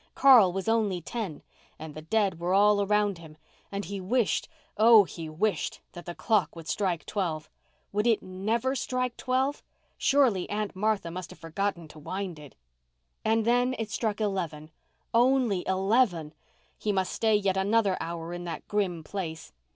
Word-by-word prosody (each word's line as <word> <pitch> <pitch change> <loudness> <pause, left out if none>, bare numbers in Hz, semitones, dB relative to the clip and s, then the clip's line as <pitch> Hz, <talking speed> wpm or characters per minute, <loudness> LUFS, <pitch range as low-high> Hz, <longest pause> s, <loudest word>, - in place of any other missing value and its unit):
Carl 245 -9 +7
was 190 +2 -4
only 215 -5 +1
ten 180 -2 -5 0.3
and 155 -1 -8
the 155 - -8
dead 195 +1 0
were 175 +2 0
all 205 +1 +5
around 205 -2 +1
him—and 160 +5 -10
he 195 +2 -5
wished, 230 +4 0 0.3
oh, 220 0 +7
he 165 -3 -7
wished 170 0 -1
that 175 0 -11
the 175 - -5
clock 215 -6 +1
would 165 -1 -10
strike 180 -6 -1
twelve. 165 -7 -3 0.4
Would 210 +3 0
it 225 -2 +2
never 220 +8 -1
strike 255 -2 -2
twelve? 260 +2 0 0.4
Surely 255 -10 +3
Aunt 210 -1 -3
Martha 200 -3 0
must 180 +1 -6
have - - -12
forgotten 170 +1 -3
to 155 - -13
wind 185 +1 -5
it. 145 -3 -13 0.7
And 225 0 +2
then 245 +2 +2
it 220 -2 -4
struck 215 -1 -1
eleven—only 195 - -1
eleven! 190 -5 +1 0.5
He 210 - 0
must 190 -2 -1
stay 220 -1 +2
yet 195 -2 +1
another 200 0 +2
hour 170 0 -5
in 175 0 -5
that 165 -2 -6
grim 185 -6 -1
place. 160 -3 -6
195 Hz, 160 wpm, -28 LUFS, 170-220 Hz, 0.7 s, Carl